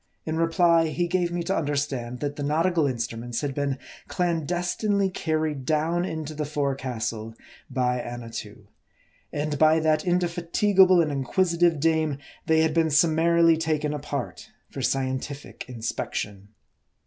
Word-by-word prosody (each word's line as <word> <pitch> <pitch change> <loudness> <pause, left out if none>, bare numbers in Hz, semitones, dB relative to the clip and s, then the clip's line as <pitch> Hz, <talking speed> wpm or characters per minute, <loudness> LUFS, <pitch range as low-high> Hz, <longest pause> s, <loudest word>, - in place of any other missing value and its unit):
In 160 - -2
reply, 165 0 +3
he 175 +3 -1
gave 175 -1 0
me 175 0 -2
to 195 +3 -1
understand, 140 -6 -2
that 145 0 -2
the 145 - -6
nautical 160 +2 +2
instruments 115 -1 -3
had 145 -2 -2
been 140 -1 -1 0.3
clandestinely 180 +4 0
carried 155 -5 -1
dpwn 160 +5 0
into 155 -1 -5
the 150 0 -3
forecastle 130 -6 -3 0.3
by 125 -1 0
Annatoo; 115 -4 -7 0.6
and 145 0 -2
by 155 +1 +5
that 155 -1 +2
indefatigable 180 +1 +3
and 155 - -2
inquisitive 170 +4 +1
dame 160 -2 +1 0.3
they 160 0 +4
had 160 -1 +2
been 165 0 +2
summarily 165 +2 +4
taken 155 -2 -1
apart 145 -3 -5 0.2
for - - -5
scientific 135 +1 -3
inspection. 105 -4 -4
155 Hz, 130 wpm, -25 LUFS, 135-170 Hz, 0.6 s, by